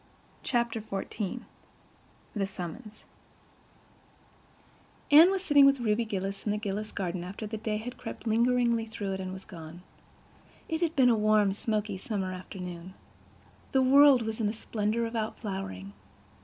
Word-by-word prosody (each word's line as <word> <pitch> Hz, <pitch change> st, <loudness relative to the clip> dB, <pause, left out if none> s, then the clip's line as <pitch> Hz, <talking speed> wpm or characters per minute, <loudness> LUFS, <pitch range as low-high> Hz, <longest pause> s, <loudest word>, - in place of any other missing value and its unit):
Chapter 235 Hz, -3 st, 0 dB
XIV 210 Hz, +2 st, -4 dB, 0.9 s
The 195 Hz, -2 st, 0 dB
Summons 195 Hz, +4 st, -8 dB, 2.1 s
Anne 315 Hz, +5 st, +9 dB
was 385 Hz, -1 st, -1 dB
sitting 285 Hz, -2 st, +6 dB
with 275 Hz, -1 st, +3 dB
Ruby 230 Hz, 0 st, +1 dB
Gillis 195 Hz, -1 st, -4 dB
in -, -, -2 dB
the 210 Hz, -, +1 dB
Gillis' 210 Hz, 0 st, -4 dB
garden 180 Hz, -2 st, -3 dB
after 195 Hz, +4 st, -6 dB
the 220 Hz, +1 st, -4 dB
day 215 Hz, 0 st, -2 dB
had 245 Hz, +4 st, -7 dB
crept -, -, -8 dB
lingeringly 235 Hz, 0 st, +2 dB
through 205 Hz, -3 st, -4 dB
it 190 Hz, -, -4 dB
and 185 Hz, -1 st, -4 dB
was 190 Hz, 0 st, -9 dB
gone. 165 Hz, 0 st, -10 dB, 0.8 s
It 325 Hz, 0 st, -2 dB
had 330 Hz, -2 st, 0 dB
been 260 Hz, -3 st, +5 dB
a 235 Hz, -, +4 dB
warm, 210 Hz, -2 st, +3 dB
smoky 210 Hz, -2 st, -2 dB
summer 190 Hz, -3 st, -3 dB
afternoon. 180 Hz, -1 st, -8 dB, 0.8 s
The 265 Hz, -1 st, +4 dB
world 275 Hz, -1 st, +7 dB
was 220 Hz, +1 st, -3 dB
in 210 Hz, -, +1 dB
a -, -, -3 dB
splendor 220 Hz, +1 st, -1 dB
of 230 Hz, +1 st, -5 dB
out 220 Hz, -1 st, -2 dB
flowering. 145 Hz, -, -6 dB
215 Hz, 155 wpm, -29 LUFS, 195-235 Hz, 2.1 s, Anne